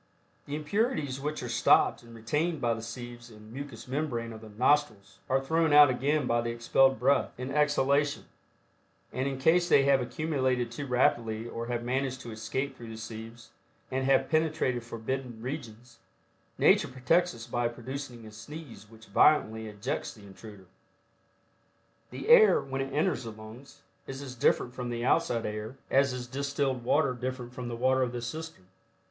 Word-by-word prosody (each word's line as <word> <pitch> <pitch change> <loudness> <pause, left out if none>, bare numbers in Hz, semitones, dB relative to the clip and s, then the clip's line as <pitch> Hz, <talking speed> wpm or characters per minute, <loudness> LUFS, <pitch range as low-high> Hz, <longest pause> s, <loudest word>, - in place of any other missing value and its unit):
The 145 - -3
impurities 155 - -1
which 150 0 -4
are - - -4
stopped 120 - +3
and 115 -1 -14
retained 150 +9 -1
by 120 -2 +1
the 115 - -5
sieves 120 +1 -8
and 110 0 -14
mucous 135 -4 -8
membrane 125 -5 -3
of 110 - -10
the 110 - -11
nostrils, 110 -5 +1
are 130 - +3
thrown 160 +3 +1
out 145 -2 +8
again 140 +3 0
by 120 -1 +1
the 120 - -3
expelled 120 +3 +3
breath, 135 +4 +2
in 130 +2 -5
exhalation, 145 -1 +2 0.9
and 130 +2 -1
in 135 -1 -3
case 170 +6 +3
they 140 - +6
have 135 -1 +4
accumulated 130 -2 -1
too 140 +4 -6
rapidly 115 -3 +1
or 115 0 -5
have 120 -1 -2
managed 130 +1 -1
to 120 - -8
escape 110 +6 -3
through 115 -1 -10
the 110 - -8
sieves 110 +1 -9 0.4
and 130 0 -1
have 135 0 +3
penetrated 155 -6 0
forbidden 120 +1 -5
regions, 120 -2 -7 0.6
nature - - +4
protects 135 +7 +1
us 115 -1 -9
by 120 0 -1
producing 120 0 -7
a 110 - -10
sneeze 120 -1 -10
which 110 0 -16
violently 110 -2 +3
ejects 105 +5 -4
the 105 -2 -15
intruder. 100 0 -12 1.4
The - - -7
air, 470 -2 +7
when 135 0 -4
it 135 0 -4
enters 150 +1 0
the 115 - -5
lungs 110 +5 -13 0.2
is 135 +1 -6
as 130 -2 -7
different 125 0 +1
from 125 -1 -5
the 120 0 -3
outside 130 -6 +1
air, 105 +4 -5
as 140 0 +4
is 125 -1 -5
distilled 140 0 -2
water 140 +2 +2
different 125 0 -5
from 125 -1 -6
the 120 - -4
water 130 +2 +2
of 125 -1 0
the 120 -1 -4
cistern. 155 - -7
125 Hz, 175 wpm, -29 LUFS, 115-140 Hz, 1.4 s, out